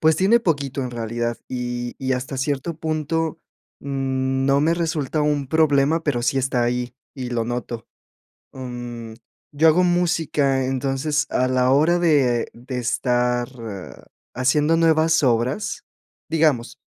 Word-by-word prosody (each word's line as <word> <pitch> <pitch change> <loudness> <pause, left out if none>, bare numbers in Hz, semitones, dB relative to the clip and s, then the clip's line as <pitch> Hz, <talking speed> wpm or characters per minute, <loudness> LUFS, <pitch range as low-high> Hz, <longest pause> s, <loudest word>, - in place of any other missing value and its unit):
pues 160 0 +4
tiene 210 +6 +4
poquito 140 - -1
en 125 - -4
realidad, 120 0 -3
y 120 -1 -4
y 130 0 -1
hasta 130 +2 -4
cierto 140 +4 -2
punto, 160 0 -2 0.4
mm, 135 -1 -1
no 140 +1 +3
me 160 +3 +3
resulta 155 -3 -1
un 145 -2 0
problema, 155 +1 +3
pero 145 -6 0
sí 135 - +1
está 125 -2 +1
ahí, 120 0 -2 0.2
y 125 -3 -5
lo 115 -2 -1
noto, 120 -1 -4 0.7
mm, 120 -3 -7 0.4
yo 155 +2 +3
hago 165 +3 +5
música, 160 -6 +1
entonces, 135 +3 0
a 130 - +2
la 130 0 +2
hora 155 +6 +4
de 140 -9 +2
de 125 +2 -7
estar 125 0 0 0.9
haciendo 150 +5 +2
nuevas 160 -1 +3
obras, 125 - 0 0.4
digamos, 155 -7 +1
135 Hz, 135 wpm, -22 LUFS, 125-155 Hz, 0.9 s, hago